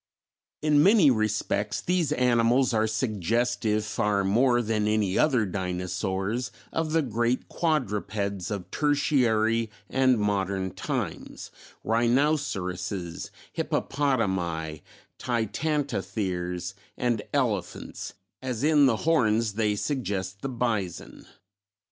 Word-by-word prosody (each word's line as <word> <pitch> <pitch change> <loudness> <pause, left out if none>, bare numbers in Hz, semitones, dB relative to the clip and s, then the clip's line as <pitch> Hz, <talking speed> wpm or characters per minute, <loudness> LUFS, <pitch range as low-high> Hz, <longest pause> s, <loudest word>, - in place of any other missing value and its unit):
In 150 -1 +4
many 195 -5 +6
respects 105 -2 0
these 180 -3 0
animals 125 +1 +3
are 110 0 +2
suggestive 110 0 0
far 100 -1 0
more 120 +5 +3
than 105 -1 0
any 105 -3 +1
other 130 -8 +3
dinosaurs, 95 +5 -2 0.2
of 160 -1 -1
the 165 -1 +3
great 120 0 0
quadrupeds 105 - -1
of 100 -4 -5
Tertiary 115 -7 +2 0.2
and 130 -2 +3
modern 95 -2 -1
times, - - -4 0.3
rhinoceroses, 110 - 0 0.2
hippopotami, 95 - -1 0.4
titanotheres 100 - -2 0.2
and 120 -3 0
elephants, 110 -11 -2 0.3
as 130 -2 -3
in 150 -2 +5
the 115 -4 +2
horns 115 -9 +2
they 105 -1 +1
suggest 100 -7 -3
the 135 - -3
bison. 115 -8 -3
110 Hz, 95 wpm, -27 LUFS, 100-130 Hz, 0.4 s, many